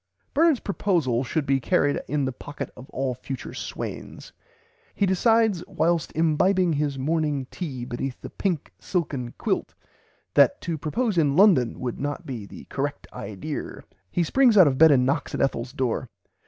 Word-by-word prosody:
Bernard's 315 -2 +4
proposal 165 - 0
should 145 +3 -1
be 135 0 +2
carried 145 +1 +1
in 145 -1 0
the 130 - -1
pocket 145 +3 -7
of 125 +2 -12
all 130 -1 -2
future 130 +1 -7
swains. - - -7 0.6
He 200 - +2
decides 215 0 +3
"whilst 170 -3 0
imbibing 170 +3 +3
his 145 -1 -1
morning 150 -1 0
tea 135 -9 -5
beneath 125 +1 -4
the - - -9
pink 170 - -2
silken 140 - -2
quilt," - - -2 0.6
that - - +5
to 170 - -2
propose 200 - 0
in 145 -3 +2
London 170 - +4
would 125 -2 -4
not 145 +1 -3
be 115 -7 -6
the - - -11
"correct - - -3
idear." 105 +10 -6 0.3
He 175 - +1
springs 240 - +4
out 185 - +9
of 135 -3 +1
bed 160 0 +9
and 130 -4 +4
knocks 140 +3 -1
at - - -2
Ethel's 125 -2 -1
door. 130 -3 -2
150 Hz, 165 wpm, -25 LUFS, 130-180 Hz, 0.6 s, out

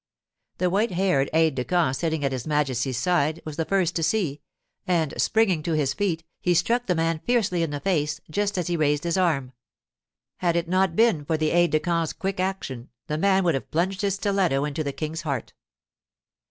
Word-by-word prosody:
The 180 -1 +1
white 210 +5 +2
haired 175 -7 +1
aide 160 0 +3
de 125 -1 -2
camp 165 -4 +1
sitting 160 0 -1
at 135 - 0
his 130 0 -4
Majesty's 135 -4 0
side 160 +2 +1
was 155 -2 -6
the 165 0 -1
first 190 -3 +1
to - - -1
see, 160 -4 0 0.5
and 165 -5 +1
springing 210 -8 +2
to 165 +2 -2
his 145 -3 +1
feet, 170 -2 -1 0.2
he 175 -1 +1
struck 235 +8 +1
the 180 - +2
man 165 0 0
fiercely 215 -8 +1
in 165 - 0
the 145 0 -4
face 155 -4 0
just 205 +5 -1
as 180 - 0
he 175 - -1
raised 150 -1 +1
his 170 -1 0
arm. 155 -9 +1 0.9
Had 175 -2 0
it 170 -1 0
not 185 +2 +1
been 220 -9 +3
for 160 +2 -1
the 155 0 0
aide 175 0 +4
de 155 - +2
camp's 165 -1 -1
quick 195 -1 -3
action, 185 -10 -3 0.2
the 150 0 -3
man 195 +1 +3
would 170 -2 +2
have 135 -6 -4
plunged 185 +4 -1
his 200 -2 +1
stiletto 195 -9 +1
into 150 +1 -3
the 140 - -2
King's 155 +3 -4
heart. 140 -6 -4
165 Hz, 205 wpm, -25 LUFS, 150-185 Hz, 0.9 s, aide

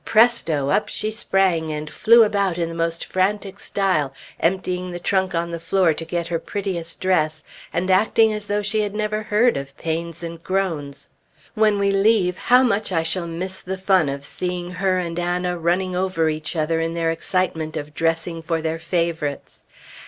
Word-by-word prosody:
Presto! 190 - +3
up 210 - +2
she 215 +1 -2
sprang, 190 -6 +1
and 150 0 -4
flew 230 +9 +5
about 200 -4 +1
in 170 -1 -1
the - - -6
most 165 0 -1
frantic 195 +1 -1
style, 185 -9 0 0.3
emptying 180 +1 0
the 175 0 -5
trunk 190 0 0
on 170 0 -1
the 170 - -4
floor 180 -1 +2
to 165 - -5
get 170 +1 -2
her 170 0 -2
prettiest 175 -3 -4
dress, 155 -5 +1 0.3
and 185 +2 0
acting 220 +3 +4
as 210 -1 -4
though 205 0 0
she 215 +2 +1
had 205 -1 -3
never 215 0 -1
heard 215 +3 +2
of 140 0 -7
pains 165 +1 -4
and 165 0 -7
groans. 165 -7 -2 0.4
When 215 -2 +3
we 200 0 +2
leave, 195 -2 +3
how 250 +6 +4
much 215 -4 +1
I 165 -2 +1
shall 170 +1 0
miss 185 +3 -5
the 190 +1 -4
fun 185 -5 +3
of 140 0 -5
seeing 180 +2 -4
her 185 0 0
and 175 -1 -2
Anna 180 0 -1
running 180 +2 0
over 180 -3 +1
each 155 +2 -5
other 160 +1 0
in 165 +1 -2
their 165 -1 +1
excitement 165 -2 -1
of 150 0 -6
dressing 165 +1 -1
for 165 0 -1
their 160 0 -2
favorites. 165 -3 -2
180 Hz, 185 wpm, -22 LUFS, 165-195 Hz, 0.4 s, flew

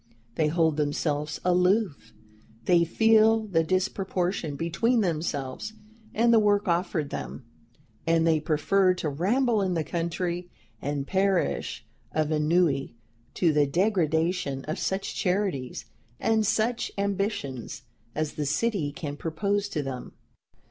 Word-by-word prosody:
They 155 +5 +1
hold 160 -1 +2
themselves 150 0 -1
aloof; 180 - +2 0.5
they 175 -2 +5
feel 220 +5 +4
the 170 -6 +1
disproportion 185 -2 -1
between 195 - +1
themselves 160 +1 -2 0.4
and 235 +1 +4
the 225 - +7
work 205 -1 +2
offered 170 -4 0
them, 125 - -6 0.6
and 165 0 +3
they 160 -1 +3
prefer 180 +5 +2
to 165 -4 -2
ramble 215 - +1
in 185 -2 0
the 160 - 0
country 170 +2 -3 0.3
and 145 -1 -2
perish 190 - 0 0.3
of 155 0 0
ennui, 150 -4 +1 0.4
to 165 -4 +3
the 145 -1 +3
degradation 165 -4 0
of 155 +5 -3
such 190 +1 -2
charities 180 -9 -1 0.3
and 220 -2 +2
such 225 +3 0
ambitions 195 - -2 0.3
as 155 -1 -2
the 150 -2 -3
city 170 -1 0
can 145 -1 -5
propose 200 +7 -1
to 150 -6 -2
them. 130 -2 -6
170 Hz, 125 wpm, -27 LUFS, 150-200 Hz, 0.6 s, the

